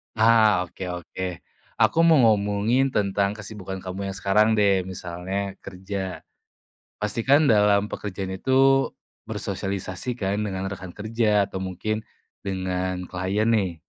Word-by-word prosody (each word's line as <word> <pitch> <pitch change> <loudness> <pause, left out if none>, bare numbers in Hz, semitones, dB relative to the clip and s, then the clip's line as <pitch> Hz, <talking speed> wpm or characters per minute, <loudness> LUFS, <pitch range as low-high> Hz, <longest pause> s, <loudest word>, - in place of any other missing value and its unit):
Hah, 110 -4 +5
oke 85 - -15 0.2
oke. 90 +2 -7 0.5
Aku 165 - +3
mau 165 - +7
ngomongin 110 +4 +3
tentang 100 -3 0
kesibukan 100 -3 -7
kamu 95 +1 -4
yang 95 - -4
sekarang 105 +3 +3
deh, 100 -2 +4
misalnya 95 +2 -5
kerja. 95 0 -6 0.7
Pasti 105 +3 -3
kan 145 +3 +6
dalam 105 -1 +3
pekerjaan 95 -2 -5
itu 135 +2 +4 0.4
bersosialisasi 95 +4 -4
kan 100 -3 -1
dengan 95 -1 -3
rekan 95 -3 -8
kerja 105 -1 +1
atau 95 -1 -5
mungkin 105 +4 -3 0.3
dengan 95 -1 -2
klien 95 +5 0
nih. 95 -7 0
100 Hz, 125 wpm, -24 LUFS, 95-110 Hz, 0.7 s, mau